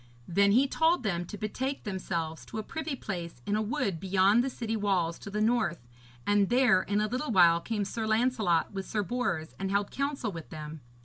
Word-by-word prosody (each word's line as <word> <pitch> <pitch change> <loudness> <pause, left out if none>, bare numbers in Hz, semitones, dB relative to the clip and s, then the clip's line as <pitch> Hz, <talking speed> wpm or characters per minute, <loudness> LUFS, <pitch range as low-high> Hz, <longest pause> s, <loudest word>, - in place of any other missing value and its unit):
Then 200 +3 +3
he 265 +5 +5
told 320 +1 +2
them 175 -5 -1
to 210 - -8
betake 260 +7 -3
themselves 170 - -3
to - - -7
a 215 - -2
privy 315 +3 -4
place 170 - -6
in 205 - 0
a 215 - +1
wood 210 -5 -1
beyond 195 +5 +3
the 270 - -1
city 225 -3 -3
walls 185 -6 0
to - - -8
the 210 +1 -2
north, 215 - +1 0.4
and 205 -1 +3
there 245 -6 +4
in 205 +2 0
a 215 - +1
little 255 +7 -3
while 170 -4 +6
came 210 -1 -2
Sir 220 +3 -3
Lancelot 220 -7 +1
with 195 -1 -5
Sir 210 -1 -1
Bors, 195 -8 -2
and 195 0 -2
held 200 +1 0
counsel 275 -5 -2
with 165 -4 -8
them. 155 0 -8
205 Hz, 205 wpm, -29 LUFS, 175-235 Hz, 0.4 s, while